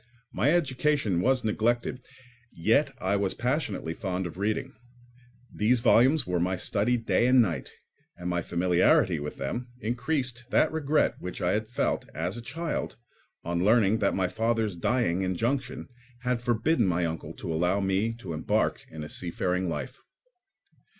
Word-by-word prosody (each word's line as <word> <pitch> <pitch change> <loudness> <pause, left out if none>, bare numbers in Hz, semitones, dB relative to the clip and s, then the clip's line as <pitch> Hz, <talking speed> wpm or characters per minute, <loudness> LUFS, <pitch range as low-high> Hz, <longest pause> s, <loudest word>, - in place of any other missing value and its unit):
My 140 - +2
education 140 - +1
was 130 +3 +2
neglected, 120 +3 0 0.5
yet 115 - +2
I 95 +2 0
was 100 -1 0
passionately 125 - -1
fond 95 -1 -3
of 85 +2 -7
reading. 105 +2 -1 0.8
These 115 +3 +2
volumes 130 +5 +5
were 90 -1 0
my 90 +2 +1
study 105 +6 0
day 120 +1 +1
and 130 0 +5
night, 85 - +1 0.5
and 90 0 -6
my 90 -1 0
familiarity 85 0 +3
with 75 +1 -6
them 120 - -3
increased 125 +1 -2
that 155 - +3
regret 155 -1 +1
which 90 - -6
I 90 - +1
had 110 +2 -1
felt, 120 - -1
as 80 +6 -2
a 120 - -6
child, 160 +7 -4 0.5
on 85 +1 -1
learning 110 0 +4
that 100 -3 +1
my 95 -1 +1
father's 110 0 0
dying 90 -1 +1
injunction 125 +8 -2 0.3
had 125 -1 -1
forbidden 120 +3 +2
my 90 -1 +1
uncle 80 0 -4
to 80 - -5
allow 90 +5 +1
me 95 +3 +1
to 105 -8 -7
embark 80 - 0
in 80 -1 -7
a - - -6
seafaring 90 +2 -2
life. 130 +10 -5
110 Hz, 155 wpm, -28 LUFS, 90-125 Hz, 0.8 s, volumes